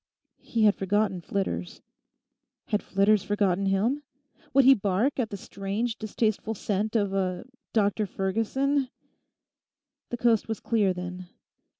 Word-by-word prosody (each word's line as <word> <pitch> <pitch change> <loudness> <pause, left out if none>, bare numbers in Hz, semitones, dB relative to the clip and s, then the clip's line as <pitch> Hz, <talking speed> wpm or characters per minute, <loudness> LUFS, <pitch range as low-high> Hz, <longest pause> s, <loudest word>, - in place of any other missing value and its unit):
He 230 -2 -1
had 210 -1 +6
forgotten 195 -1 0
Flitters. 190 -1 -3 0.9
Had 210 -1 +1
Flitters 200 +1 +3
forgotten 200 -1 +1
him? 220 +9 +1 0.5
Would 275 0 +5
he 270 - +9
bark 210 +5 0
at 230 -3 0
the 200 - -5
strange, 200 +5 -3
distasteful 220 0 -1
scent 210 +2 -2
of 200 -3 +1
a—Dr 205 +2 -1
Ferguson? 250 +9 0 1.2
The 240 - -3
coast 230 -2 +2
was 220 -1 -3
clear, 210 -5 +2
then. 180 0 -6
205 Hz, 120 wpm, -27 LUFS, 195-225 Hz, 1.2 s, he